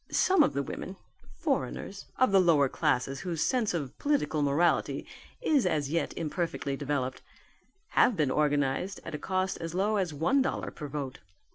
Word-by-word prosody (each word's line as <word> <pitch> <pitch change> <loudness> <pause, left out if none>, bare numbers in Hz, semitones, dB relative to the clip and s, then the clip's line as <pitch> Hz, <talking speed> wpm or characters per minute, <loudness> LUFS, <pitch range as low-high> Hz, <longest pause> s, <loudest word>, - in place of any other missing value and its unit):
Some 375 -3 +4
of 290 - +3
the 140 - -1
women 185 +6 -6 0.4
foreigners 65 - -2
of 255 -4 +4
the 195 - +6
lower 155 -6 +4
classes 135 +1 0
whose 170 -4 -2
sense 245 -5 +1
of 140 -6 -4
political 285 - +1
morality 145 +5 +1 0.4
is 285 - +3
as 150 -4 0
yet 165 0 0
imperfectly 165 -3 -2
developed 135 -2 -2 0.7
have 235 - +3
been 145 -4 +2
organized 145 +5 0
at 170 - -6
a 150 - -3
cost 185 0 -1
as 165 0 -5
low 205 +3 +1
as 185 -4 0
one 165 - +2
dollar 265 - -2
per 150 - -7
vote. 140 -2 -5
165 Hz, 165 wpm, -29 LUFS, 140-195 Hz, 0.7 s, the